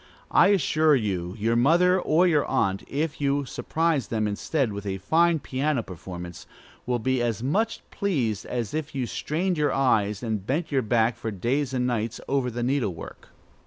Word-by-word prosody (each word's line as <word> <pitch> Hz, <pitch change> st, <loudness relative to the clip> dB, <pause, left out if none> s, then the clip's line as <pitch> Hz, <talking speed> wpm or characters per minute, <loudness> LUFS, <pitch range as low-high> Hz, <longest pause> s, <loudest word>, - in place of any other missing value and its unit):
I -, -, +6 dB
assure 160 Hz, -5 st, +3 dB
you 95 Hz, -6 st, -2 dB
your 115 Hz, +2 st, +1 dB
mother 175 Hz, +9 st, +4 dB
or 170 Hz, +3 st, +3 dB
your 155 Hz, -5 st, +3 dB
aunt, 95 Hz, 0 st, 0 dB
if 150 Hz, +2 st, -3 dB
you 140 Hz, 0 st, +1 dB
surprise 150 Hz, +1 st, -1 dB
them 110 Hz, -2 st, -1 dB
instead 115 Hz, +3 st, -1 dB
with 100 Hz, 0 st, -6 dB
a 95 Hz, 0 st, -2 dB
fine 165 Hz, -, +3 dB
piano 135 Hz, -2 st, -1 dB
performance, 90 Hz, -1 st, -9 dB, 0.4 s
will 125 Hz, -1 st, +1 dB
be 130 Hz, +2 st, 0 dB
as 115 Hz, -2 st, -1 dB
much 215 Hz, -, 0 dB
pleased 125 Hz, -, -1 dB
as 120 Hz, -4 st, -3 dB
if 155 Hz, -2 st, -4 dB
you 130 Hz, -2 st, -1 dB
strained 170 Hz, -, -2 dB
your 150 Hz, -, +2 dB
eyes 105 Hz, -6 st, +1 dB
and 110 Hz, -4 st, -2 dB
bent 150 Hz, -, -2 dB
your 135 Hz, -2 st, +2 dB
back 115 Hz, 0 st, +1 dB
for 115 Hz, -, -4 dB
days 120 Hz, +7 st, -1 dB
and 125 Hz, -1 st, 0 dB
nights 115 Hz, -2 st, -2 dB
over 135 Hz, -2 st, 0 dB
the 120 Hz, 0 st, -4 dB
needle 125 Hz, -8 st, 0 dB
work. -, -, -10 dB
125 Hz, 180 wpm, -25 LUFS, 110-150 Hz, 0.4 s, I